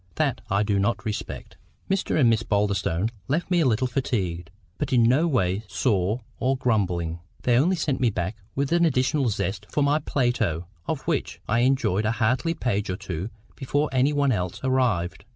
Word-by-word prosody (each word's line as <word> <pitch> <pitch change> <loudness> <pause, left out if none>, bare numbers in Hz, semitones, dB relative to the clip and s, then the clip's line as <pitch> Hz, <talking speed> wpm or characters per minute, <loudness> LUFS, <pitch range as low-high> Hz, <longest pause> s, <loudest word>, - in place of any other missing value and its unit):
That - - 0
I 100 +2 +2
do 100 -2 +1
not 115 +5 0
respect. 105 -1 -5 0.3
Mr 195 -4 0
and 130 - +5
Miss 115 -1 +3
Boulderstone 100 -2 0 0.2
left 165 +6 -1
me 175 - +4
a 160 - +3
little 120 +1 +2
fatigued, 95 -10 -2 0.3
but - - -2
in 120 -3 +4
no 130 +9 +4
way 100 - +1
sore 105 0 0 0.2
or 130 +1 +1
grumbling. 90 -9 0 0.2
They 120 - +3
only 165 +10 +3
sent 150 -5 -1
me 125 -2 +3
back 95 0 -3 0.2
with 140 +1 -1
additional 150 -5 +2
zest 100 0 -3
to 150 - +1
my 145 +2 +3
Plato, 120 - 0 0.2
of - - -2
which - - -2
I 115 +2 +2
enjoyed 120 -5 +2
a 110 - +1
hearty 130 +9 +1
page 105 - -1
or 90 - -2
two 90 +3 -5 0.3
before 145 +2 0
any 130 +3 +3
one 145 -2 +2
else 90 -5 -2
arrived. 115 -10 0
115 Hz, 180 wpm, -25 LUFS, 100-135 Hz, 0.3 s, and